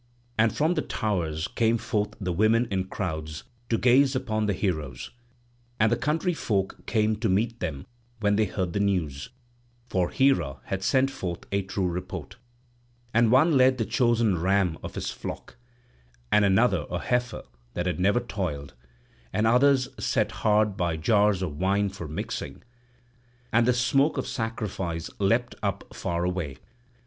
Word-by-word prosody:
And 110 -1 +3
from 155 +3 +3
the - - 0
towers 85 -7 -2
came 115 0 +1
forth 105 -2 -2
the 90 -3 -2
women 110 +6 +3
in 95 -1 0
crowds 80 -5 -4 0.3
to 115 - +2
gaze 130 +3 +4
upon 110 -5 -1
the 100 - +1
heroes; 80 - -3 0.7
and 110 +1 +4
the - - +4
country 150 +8 0
folk 100 -10 -2
came 110 -1 +2
to 110 0 0
meet 115 +5 0
them 75 -6 -4 0.3
when 105 -1 +2
they 110 +1 +3
heard 90 -2 -3
the - - 0
news, 90 -7 -1 0.6
for 90 -2 +1
Hera 85 - +2
had 95 -1 -3
sent 135 +6 +2
forth 90 -8 -5
a 100 0 +1
true 95 0 -2
report. 90 +1 -5 0.8
And 115 0 +4
one 150 +5 +5
led 130 0 +5
the 115 - 0
chosen 115 -5 +2
ram 95 -3 +1
of - - -7
his - - -3
flock, - - -7 0.8
and 105 - +5
another 100 +5 +3
a - - -2
heifer 125 -1 -1 0.3
that 90 - -1
had 90 0 -1
never 100 +6 +3
toiled; 85 - -4 0.6
and 110 +2 +1
others 130 +3 +4 0.2
set 110 -1 +1
hard 105 -2 +3
by 85 -4 -1
jars 100 +2 +3
of 75 -5 -4
wine 100 +2 +2
for 95 -4 -7
mixing; 75 - -5 0.9
and 115 0 +4
the - - +6
smoke 135 +5 +2
of - - -1
sacrifice 105 - -3
leapt 115 +5 +1
up 100 -3 -3
far 85 0 -2
away. 90 -7 -2
105 Hz, 160 wpm, -26 LUFS, 90-120 Hz, 0.9 s, the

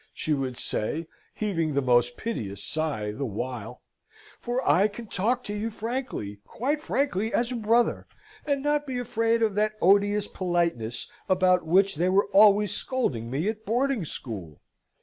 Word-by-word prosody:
she 155 - -1
would 130 -3 -2
say, 155 +10 -2 0.3
heaving 165 -8 -1
the - - +3
most 120 -1 +3
piteous 100 - -4
sigh 145 -10 -2
the 130 +7 -5
while; 120 -1 -5 0.6
"for 245 +2 -2
I 195 +4 +5
can 220 +3 -9
talk 230 +5 0
to 205 - -5
you 215 +2 -2
frankly, 225 - -4
quite 290 +5 -2
frankly 230 - 0
as 240 +1 0
a - - -2
brother, 230 +1 +1 0.4
and 280 -2 -1
not 295 0 +1
be 260 -2 -3
afraid 230 -1 +1
of 215 -2 +2
that 210 +1 +1
odious 205 +2 +3
politeness 170 -11 -1 0.2
about 185 -2 +3
which 190 0 +3
they 175 +3 +2
were 195 +2 +4
always 205 0 +6
scolding 125 - -1
me 145 +9 -1
at 220 0 -3
boarding 245 0 0
school. 100 - -6
200 Hz, 160 wpm, -26 LUFS, 140-230 Hz, 0.6 s, always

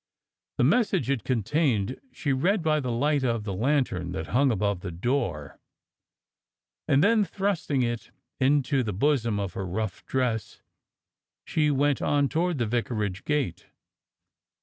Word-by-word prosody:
The - - +3
message 205 - +2
it 130 -6 -1
contained 125 -2 0
she 140 -3 -1
read 175 +8 +1
by 155 -1 +2
the 130 -4 -2
light 140 +4 +1
of 115 -4 0
the 100 -2 -4
lan 135 +8 +2
tern 90 -6 -5
that 80 -3 -5
hung 135 +3 +4
above 100 -4 0
the 90 - -6
door, 90 - -2 1.3
and 140 +4 +4
then, 220 +1 +4
thrusting 190 -9 -1
it 120 -1 -3 0.3
into 140 0 +2
the 110 -4 -2
bosom 115 -1 +1
of 100 -3 -3
her 95 - -4
rough 100 +1 -3
dress, 125 -5 -2 0.8
she 150 -1 +1
went 145 0 +1
on 145 -1 +2
toward 170 0 0
the 120 - 0
vicarage 110 -4 -2
gate. 145 - -1
130 Hz, 150 wpm, -27 LUFS, 105-145 Hz, 1.3 s, hung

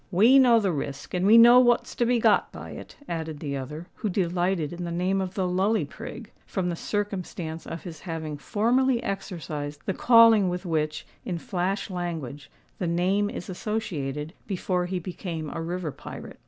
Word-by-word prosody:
"We 220 +9 +6
know 240 -3 +6
the 200 -4 +1
risk, 140 -3 -5
and 180 +1 +1
we 220 +2 +8
know 240 +2 +9
what's 240 -1 +3
to 240 - 0
be 245 0 +3
got - - +3
by - - -9
it," - - -10
added 160 -3 -4
the 140 -2 -3
other, 150 +5 -6
who 215 - -2
delighted 175 -3 0
in 175 +1 -6
the 170 - -3
name 185 +3 0
of 185 0 -4
the 190 -2 0
Lully 195 +5 +1
Prig, - - -9 0.2
from 185 -3 -1
the 170 - -2
circumstance 180 -5 -4
of 165 - -6
his 165 -4 -8
having 160 -4 -5
formerly 245 - +1
exercised 155 -7 -5
the 195 - 0
calling 230 -5 +6
with 180 +2 -4
which, 155 -2 -1 0.2
in 180 - -3
flash 190 +4 -2
language, 160 -6 -5 0.3
the 180 - -1
name 185 +5 +1
is 180 - -6
associated, 160 -7 -3
before 180 -2 -1
he 185 +1 -2
became 170 -3 -5
a - - -4
river 170 -1 -3
pirate. - - -10
180 Hz, 180 wpm, -26 LUFS, 160-205 Hz, 0.3 s, know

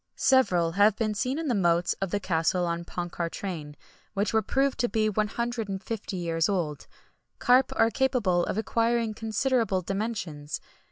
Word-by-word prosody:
Several 180 -11 +3
have 205 +3 +4
been 215 -2 -1
seen 255 +6 -1
in 325 -1 -3
the 250 - +2
moats 175 -4 +2
of 195 - -1
the 205 - -1
castle 175 -1 +1
of 170 0 -2
Ponchartrain, 170 -3 -4 0.4
which 200 +2 0
were 220 - +4
proved 270 +6 0
to 240 - +1
be 215 -1 +1
150 215 -1 -3
years 165 -1 0
old. 165 -7 -2 0.5
Carp 255 +1 +4
are 225 - +3
capable 235 -11 +1
of - - -2
acquiring 230 0 +1
considerable 225 -2 0
dimensions. 195 -7 -3
205 Hz, 150 wpm, -27 LUFS, 175-230 Hz, 0.5 s, have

